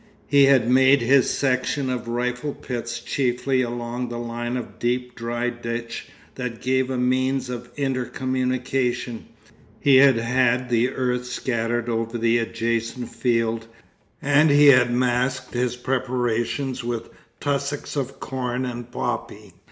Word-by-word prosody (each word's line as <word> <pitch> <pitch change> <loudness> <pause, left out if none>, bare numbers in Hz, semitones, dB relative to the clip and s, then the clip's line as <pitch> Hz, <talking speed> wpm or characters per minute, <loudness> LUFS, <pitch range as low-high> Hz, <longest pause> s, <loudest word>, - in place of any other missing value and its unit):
He 140 -1 +5
had 135 -4 +4
made 130 +2 +5
his 130 +3 +4
section 130 +1 0
of 125 -1 -4
rifle 125 +4 -2
pits 120 -1 -5
chiefly 130 +1 0
along 120 0 -3
a 120 - -4
line 120 +1 -3
of 120 - -8
deep 125 +1 -1
dry 120 +1 -2
ditch 115 -1 -5 0.3
that 125 -3 -5
gave 130 0 +1
a 130 - -2
means 130 +1 +1
of 120 0 -6
inter 135 -3 -1
communication, 130 -2 -2 0.5
he 140 -2 +5
had 135 -1 +7
had 125 +1 +1
the 120 +1 +2
earth 125 -1 -1
scattered 120 -1 -1
over 115 0 -2
the 115 0 +2
adjacent 115 +1 -2
field, 115 -2 0 0.6
and 145 +2 +4
he 145 0 +7
had 125 -3 +6
masked 125 +1 0
his 125 0 0
preparations 125 +1 -1
with 120 -1 -4 0.3
tussocks 140 0 -2
of 135 -1 -3
corn 125 -1 -3
and 120 -1 -6
poppy. - - -4
125 Hz, 135 wpm, -23 LUFS, 120-130 Hz, 0.6 s, had